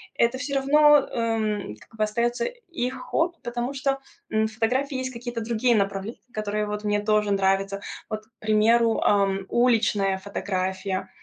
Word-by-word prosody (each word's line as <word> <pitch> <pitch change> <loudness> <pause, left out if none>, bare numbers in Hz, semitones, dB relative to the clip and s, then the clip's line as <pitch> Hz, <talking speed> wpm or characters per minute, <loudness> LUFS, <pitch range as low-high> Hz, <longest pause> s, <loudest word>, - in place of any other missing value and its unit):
Это 235 +2 +2
всё 280 -1 -3
равно, 295 +2 +6
эм, 220 - -1
как 225 - -18
бы, 215 - 0
остаётся 235 +3 0
их 350 - -4
хобби, 340 +1 -1
потому 240 +2 -3
что, 275 0 0 0.3
м, 220 0 +2
в 220 - -10
фотографии 260 +5 0
есть 255 0 -3
какие-то 235 0 -5
другие 235 +2 +2
направления, 200 +2 -1
которые, 210 0 -2
вот, 210 0 -4
мне 205 0 +1
тоже 210 -1 +2
нравятся. 195 0 +1 0.3
Вот, 215 0 -5
к 225 - -34
примеру, 225 +2 +3
ам, 195 -1 +2
уличная 220 -5 +2
фотография 190 -1 -3
220 Hz, 155 wpm, -25 LUFS, 205-245 Hz, 0.3 s, равно